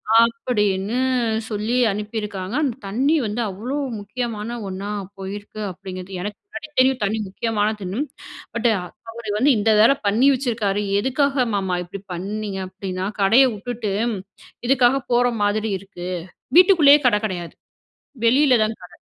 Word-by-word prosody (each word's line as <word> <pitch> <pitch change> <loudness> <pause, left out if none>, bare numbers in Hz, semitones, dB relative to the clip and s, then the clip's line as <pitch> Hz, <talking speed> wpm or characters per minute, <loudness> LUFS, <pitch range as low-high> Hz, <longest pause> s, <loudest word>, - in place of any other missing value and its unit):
அப்பிடின்னு 225 - +2 0.5
சொல்லி 215 +2 -2 0.2
அனுப்பியிருக்காங்க, 210 -1 -4
அந்த 260 -6 0
தண்ணீ 260 +10 +1
வந்து 215 +3 -2
அவ்ளோ 230 +9 -4 0.2
முக்கியமான 230 +2 -4
ஒண்ணா 195 +2 -5 0.3
போயிருக்கு 205 +2 -7
அப்பிடிங்கிறது, 185 0 -8
எனக்கு 205 +2 -5
முன்னாடி 405 -6 -8
தெரியும் 260 0 +3
தண்ணீ 210 +2 0
முக்கியமானதுன்னு. 210 0 -2 0.6
பட், 235 0 +2 0.4
அவரு 230 -2 -8
வந்து 270 +7 +4
இந்த 215 +1 +2
வேல 230 +5 +7
பண்ணி 220 +7 +4
வச்சுருக்காரு, 225 -6 -1 0.2
எதுக்காக 265 +2 +1
மாமா 190 -3 0
இப்பிடி 185 +2 -9
பண்ணீங்க? 200 +2 -4
அப்பிடின்னா 185 0 -4
கடைய 225 +7 +6
விட்டுட்டு 215 0 -4 0.7
இதுக்காக 260 0 +4
போற 245 +1 +4 0.2
மாதிரி 210 +1 0
இருக்கு. 180 -2 -8 0.5
வீட்டுக்குள்ளேயே 335 -6 +7
கட 235 - +4
கெடையாது. 175 -4 -4 0.7
வெளில 260 +3 +5
தான் 220 +1 -3
கட. 180 - -13
215 Hz, 125 wpm, -22 LUFS, 195-245 Hz, 0.7 s, வேல